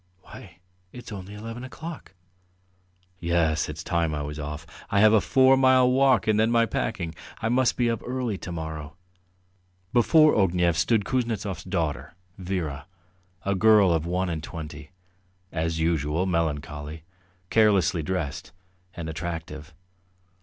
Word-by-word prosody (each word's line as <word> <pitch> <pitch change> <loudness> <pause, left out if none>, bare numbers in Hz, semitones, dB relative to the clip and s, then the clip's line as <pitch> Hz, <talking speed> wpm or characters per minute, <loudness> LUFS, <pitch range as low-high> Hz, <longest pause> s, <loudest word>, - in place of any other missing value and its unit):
Why, - - -13 0.3
it's 125 -2 -10
only 100 0 -8
eleven 115 +3 -7
o'clock." 155 - -9 1.0
"Yes, 85 -3 +1
it's 75 +2 -6
time 85 -3 0
I 75 - -3
was 75 +1 -6
off. 75 +2 -6 0.2
I 100 - +2
have 110 +1 +6
a 110 - +5
four 130 +4 +5
mile 130 -1 +5
walk 135 +1 +4
and 110 -1 +2
then 110 +1 +3
my 115 0 +3
packing. 90 -7 -3 0.3
I 110 - -1
must 125 +1 +2
be 120 -1 +2
up 115 -1 -1
early 125 -3 -2
to 90 - -7
morrow." 80 -2 -6 1.0
Before 155 +6 +5
Ognev 90 -4 +2
stood 105 +6 +2
Kuznetsov's 105 -8 -2
daughter 85 -7 -3 0.2
Vera, 90 -6 -4 0.6
a 100 - +1
girl 105 -2 +5
of 80 0 -1
one 90 +2 0
and 80 -3 -3
twenty, 80 -1 -8 0.6
as 80 0 -2
usual 80 +1 0
melancholy, 75 -3 -3 0.5
carelessly 100 -6 +3
dressed, 80 -1 -4 0.4
and 85 -2 -5
attractive. 80 -2 -6
90 Hz, 140 wpm, -25 LUFS, 80-110 Hz, 1.0 s, have